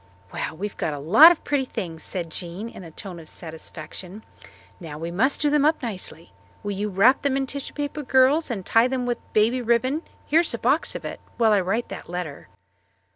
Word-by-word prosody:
"Well, - - -4
we've 205 +3 -4
got 150 - -1
a - - -6
lot 215 - +8
of 345 - -2
pretty 285 -2 0
things," 165 -9 -6
said 170 -3 -5
Jean 180 +6 -5
in 190 - -11
a 165 - -9
tone 175 +2 -9
of 160 - -11
satisfaction. 165 +4 -9 0.6
"Now 160 -5 -8
we 165 +2 -5
must 260 +11 +2
do 295 -1 +2
them 295 -1 +3
up 310 -1 +2
nicely. 185 -7 -6 0.3
Will 205 - -2
you 205 +2 -2
wrap 210 +8 +4
them 275 -2 +1
in 270 - 0
tissue 275 +1 -6
paper, 290 +1 -3
girls, 270 +4 +3
and 200 -7 -4
tie 230 +2 +4
them 255 -1 -2
with 240 -1 -1
baby 225 +4 +3
ribbon 245 +6 +1 0.2
here's 330 +3 +2
a - - -4
box - - +1
of - - -6
it - - -5 0.2
while 225 -2 +4
I 200 - +4
write 200 +6 -1
that - - -8
letter?" 175 -5 -5
220 Hz, 210 wpm, -24 LUFS, 175-265 Hz, 0.6 s, lot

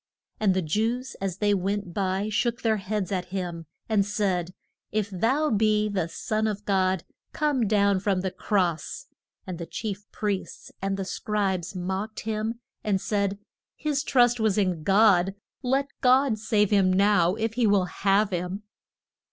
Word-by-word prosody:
And 200 -4 +3
the 190 - +1
Jews 230 - -1
as 195 -2 -2
they 205 0 +2
went 195 -1 -2
by 190 +1 0
shook 235 +2 0
their 220 -2 +2
heads 200 -1 -3
at 185 -2 -1
him, 175 -3 -5 0.2
and 215 -3 +3
said, 195 -4 -1 0.4
If 210 -1 -1
thou 260 - +1
be 215 0 +2
the 185 -5 -1
son 215 +6 -1
of 210 -1 -4
God 190 -3 +1 0.3
come 290 -7 +1
down 200 -2 +3
from 195 -1 0
the 190 0 -2
cross, 185 - -1 0.4
and 180 -2 -6
the 170 - -5
chief 205 -2 -5
priests 205 -3 -4
and 195 0 -1
the 195 - -3
scribes 190 -2 -2
mocked 190 +4 -3
him 220 +1 -2 0.3
and 200 -3 +1
said, 200 0 -1 0.4
His 295 -3 -1
trust 245 -4 +3
was 220 -2 +2
in 185 -5 +1
God; 195 0 +4 0.3
let 270 +2 0
God 255 -3 +4
save 210 -1 +2
him 195 -2 +4
now 185 -2 +3
if 225 0 -2
he 235 -1 +2
will 200 -3 +3
have 195 +3 +1
him. 180 +3 -3
205 Hz, 160 wpm, -26 LUFS, 185-220 Hz, 0.4 s, God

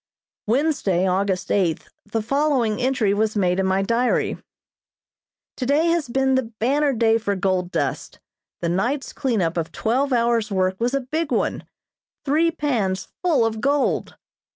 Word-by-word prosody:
Wednesday, 230 - +1
August 190 0 0
eighth, 175 -6 0 0.2
the 220 +1 -2
following 260 -3 +1
entry 250 -6 +1
was 215 +1 0
made 185 -2 +1
in 190 - +1
my 190 +1 +1
diary: 235 +4 +1 1.2
"Today 285 +6 +1
has 335 -6 0
been 265 +2 +1
the 260 -3 0
banner 280 +6 +2
day 225 -2 +2
for 205 -2 -1
gold 185 -2 0
dust. - - -3 0.4
The 170 - 0
night's 240 - -1
cleanup 200 - -1
of 165 -1 -2
twelve 260 +5 0
hours' 235 -2 +1
work 190 -1 0
was 245 +3 0
a 275 - 0
big 305 +4 -3
one - - -1 0.6
three 310 +4 +3
pans 240 - -1
full 310 -10 +3
of 220 -1 -2
gold. 280 0 0
230 Hz, 150 wpm, -22 LUFS, 195-275 Hz, 1.2 s, three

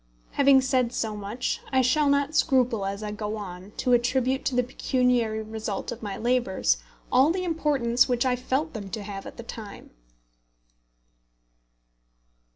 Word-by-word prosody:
Having 275 -1 +5
said 255 -2 +1
so 220 -3 -2
much, 210 +4 -3
I 260 -1 +3
shall 285 +4 +3
not 280 +1 +2
scruple 250 -10 +2
as 200 +2 -4
I 210 - -3
go 210 0 -4
on 185 -2 -8
to 250 - +1
attribute 255 +2 +2
to 260 - 0
the 250 - +3
pecuniary 245 -3 0
result 215 -1 -4
of 240 - -7
my 205 -3 -5
labours 235 - +1 0.3
all 260 +4 +5
the 365 +2 -1
importance 285 -9 +2
which 245 0 +1
I 255 -1 +2
felt 265 +5 -2
them 205 -4 -6
to 215 +1 -5
have 195 -1 -7
at - - -11
the 235 - -7
time. 220 -3 -9
245 Hz, 160 wpm, -26 LUFS, 215-260 Hz, 0.3 s, Having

